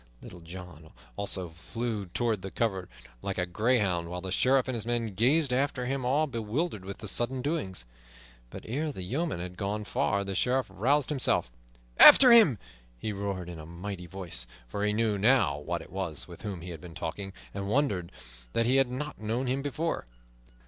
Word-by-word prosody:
Little 90 - -10
John 85 -2 -10 0.3
also 95 -3 -1
flew 105 +5 -4
toward 110 +3 -1
the 95 - -5
covert 95 -4 -1 0.3
like 100 - -3
a 90 - +1
greyhound, 95 -3 +1
while 90 +1 -4
the 95 +1 -6
Sheriff 130 +6 +3
and 130 - -2
his 115 -3 -2
men 115 -2 -2
gazed 130 - +3
after 130 -1 0
him 135 +1 -2
all 145 +5 +3
bewildered 115 - -2
with 100 +1 -7
the 105 - -7
sudden 125 +5 0
doing. 145 - -2 0.7
But - - -9
ere 150 +7 -1
the 95 - -6
yeoman 140 - -2
had 90 +1 -6
gone 105 +2 -2
far 100 0 0
the 100 0 -4
Sheriff 130 +6 +1
roused 130 +9 +2
himself. 130 - +2 0.5
"After 255 -2 +10
him!" 215 - +7 0.4
he 105 - -3
roared 100 -3 -3
in 85 -2 -7
a 80 - -9
mighty 90 +1 -6
voice; 85 -10 -5 0.2
for 100 +12 -3
he 105 - +2
knew 105 -1 +1
now 100 - +3
who - - 0
it - - -7
was 95 -6 -1
with - - -11
whom 95 -5 -5
he 90 +1 -7
had 80 - -8
been 85 -2 -11
talking, 95 +4 -4 0.2
and 100 0 -4
wondered 105 -9 0 0.4
that 115 - +2
he 130 +3 +3
had 135 -2 +4
not 140 0 -5
known 115 +4 -1
him 130 +2 0
before. 145 - -2
105 Hz, 190 wpm, -29 LUFS, 90-130 Hz, 0.7 s, After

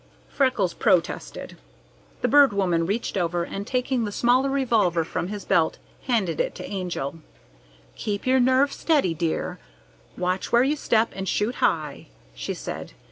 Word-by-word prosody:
Freckles 255 -10 +1
protested. 185 -4 0 0.7
The - - +4
Bird 285 -5 +6
Woman 175 -4 +1
reached 205 +1 -2
over, 175 -1 0
and, 195 +4 -6
taking 255 -1 0
the 210 - -3
smaller 250 +5 +2
revolver 230 -11 +2
from 165 - -3
his 205 0 -6
belt, 165 -2 +2 0.3
handed 200 - 0
it - - -1
to - - -7
the - - -8
Angel. 175 -6 -4 0.8
"Keep 205 -1 -3
your 260 +1 +4
nerve 260 +3 +3
steady, 290 - +1
dear; 165 0 -2 0.6
watch 180 +1 -2
where 240 +1 +5
you 285 +3 +1
step, 230 -6 +1
and 190 -1 -3
shoot 210 +4 0
high," 150 -4 0 0.3
she - - -4
said. - - -7
205 Hz, 155 wpm, -24 LUFS, 175-255 Hz, 0.8 s, Bird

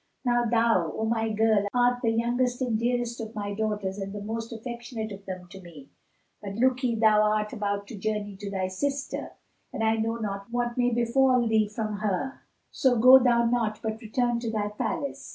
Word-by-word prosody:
Now 240 -1 +2
thou, 225 -8 +2
O 220 - -1
my 225 0 0
girl, 215 -1 +2
art 245 0 +3
the 230 - +2
youngest 245 +2 0
and 250 -4 0
dearest 240 +1 -1
of 220 0 -7
my 205 -1 -3
daughters 205 -2 -2
and 195 0 -5
the 205 - -6
most 225 +2 -4
affectionate 235 -1 -6
of 200 0 -10
them 185 -1 -6
to 190 +1 -11
me, 160 -6 -13 0.5
and 200 0 -6
look'ye 250 -1 +2
thou 215 -1 +4
art 210 +1 +1
about 205 -2 -2
to - - -7
journey 205 0 -3
to 200 0 -6
thy 190 -1 -2
sister, 275 +9 -3 0.4
and 225 - -3
I 220 0 +2
know 225 +1 -1
not 200 -3 -4
what 240 0 -1
may 245 -1 +2
befal 245 +1 +3
thee 220 -1 +3
from 215 0 -4
her; 210 +6 -2 0.3
so 255 -2 +2
go 255 +3 +9
thou 240 -2 +3
not; 230 -3 0
but 220 0 -3
return 240 +1 0
to 235 -1 -3
thy 210 -2 -1
palace." 280 +7 -4
225 Hz, 195 wpm, -27 LUFS, 210-240 Hz, 0.5 s, go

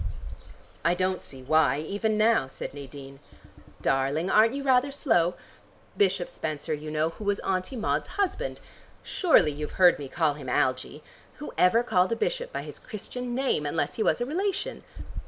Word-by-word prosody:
"I 170 +1 +3
don't 185 0 0
see 130 -1 -11
why, 145 -1 +3
even 205 +6 -1
now," 220 -9 +3
said 135 - -7
Nadine. 135 -1 -10 0.6
"Darling, 135 +7 +1
aren't 225 +4 +5
you 280 - -3
rather 260 0 +3
slow? 180 - +1 0.6
Bishop 190 -2 +2
Spenser, 155 0 -4
you 155 +1 -5
know, 155 +1 0
who 190 - -10
was 205 0 +1
Auntie 185 +6 -2
Maud's 220 - -1
husband. 410 +5 -1 0.4
Surely 325 - +3
you've 150 +1 -6
heard 180 -4 +6
me 140 -2 -6
call 160 0 +1
him 145 -3 -8
Algie. 130 +2 0 0.3
Who 295 - -8
ever 225 +6 +4
called 185 -5 +2
a - - +2
bishop - - -2
by - - -4
his - - -9
Christian 245 +2 -6
name 260 - +1
unless 145 0 -1
he - - -4
was - - +2
a 240 - 0
relation? 390 - -2
185 Hz, 170 wpm, -27 LUFS, 150-245 Hz, 0.6 s, heard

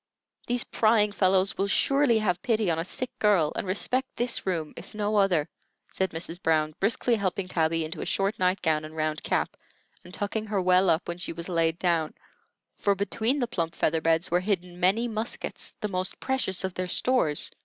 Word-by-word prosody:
These 245 0 +1
prying 215 -2 +3
fellows 190 -1 +2
will 195 - +2
surely 275 +3 +3
have 195 -5 0
pity 220 -8 +1
on 165 - 0
a - - 0
sick 250 +7 -4
girl, 195 -8 +3
and - - -3
respect 255 +7 -1
this 240 -4 -1
room 165 -5 -2
if - - -11
no 210 0 0
other," 180 -7 +3 0.4
said 190 0 0
Mrs. 165 +2 -6
Brown, 155 -1 +1
briskly 235 +4 +1
helping 190 -1 -2
Tabby 165 -2 +1
into 155 +1 -6
a - - -3
short 200 +3 0
night 185 +1 +1
gown 155 -1 +2
and 155 +1 -9
round 155 -1 -1
cap, - - -1 0.5
and 180 - -13
tucking 210 +3 -3
her 205 -2 0
well 185 0 +4
up 160 - +1
when 175 0 -4
she 175 - -3
was 170 +2 -7
laid 165 -2 +1
down, 170 -3 0 0.6
for 200 -1 +2
between 220 +6 0
the 245 -4 0
plump 170 -7 -2
feather 160 +1 +1
beds 165 +1 +1
were 175 - +4
hidden 180 -2 -2
many 200 +7 +2
muskets, 220 +1 -4
the 210 - 0
most 185 -2 -2
precious 260 -9 -1
of 190 -1 -2
their 185 0 -3
stores. 180 - +2
185 Hz, 195 wpm, -27 LUFS, 165-215 Hz, 0.6 s, well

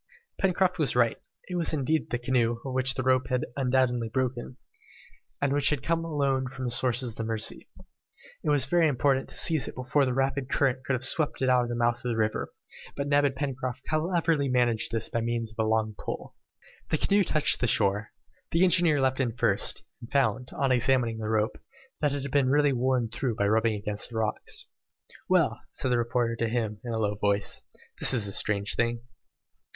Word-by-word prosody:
Pencroft 185 -1 +1
was 150 -5 +1
right. 120 -2 +2 0.3
It 180 - -7
was 165 -2 +2
indeed 155 +2 0
the 120 - -1
canoe, 120 -1 +1
of 130 - -4
which 130 +1 +2
the 130 - -2
rope 130 0 +2
had 125 -1 0
undoubtedly 125 -3 +1
broken, 125 +1 -3 0.8
and 140 -1 +1
which 145 0 +3
had 150 -4 -1
come 165 0 0
alone 140 -5 0
from 130 0 -6
the 120 - -2
sources 125 0 0
of 110 - -17
the 115 - -3
Mercy. 110 -1 -3 0.7
It - - -1
was 145 -3 +3
very 170 +3 +3
important 135 -1 +1
to - - -9
seize 160 -4 +2
it - - -7
before 130 +3 +1
the 130 -1 -1
rapid 135 0 -1
current 135 -3 +1
should 135 - +1
have 125 0 -1
swept 145 0 0
it - - +3
away 130 - +4
out 125 -1 +3
of - - -7
the 120 - -2
mouth 120 0 +1
of 125 +1 -5
the 115 - -1
river, 110 -1 -1 0.4
but 140 - -3
Neb 145 0 +4
and 135 -1 0
Pencroft 130 -2 -4
cleverly 160 -2 +1
managed 120 -3 +1
this 115 -1 -1
by 115 - -2
means 115 -1 -2
of 110 +1 -2
a - - -1
long 110 -1 +1
pole. - - -6 0.6
The - - +1
canoe 200 0 +3
touched 155 -4 +2
the 120 - +1
shore. 105 -1 +2 0.4
The 165 +2 +2
engineer 175 -4 +4
leapt 130 0 +1
in 125 -3 +1
first, 105 -4 0 0.2
and 115 - -11
found, 130 -2 +1
on 135 -1 0
examining 125 -2 +2
the 110 -1 -3
rope, 110 +1 0 0.4
that 150 -2 +1
it 140 -1 -3
had 140 - -5
been 140 -2 +2
really 145 0 +3
worn 125 -2 0
through 120 0 -2
by 100 -2 +1
rubbing 110 +1 +2
against 105 0 -5
the 115 - -6
rocks. 110 -1 -1 0.6
"Well," 160 -11 +2
said 130 - -1
the 120 - +2
reporter 120 0 0
to 115 -1 -1
him, 110 -3 -2
in 120 - -5
a 115 - -2
low 105 -2 0
voice, 100 0 0 0.4
"this - - +2
is 110 -4 +2
a - - -2
strange 100 0 +1
thing." 115 0 0
125 Hz, 210 wpm, -27 LUFS, 115-140 Hz, 0.8 s, away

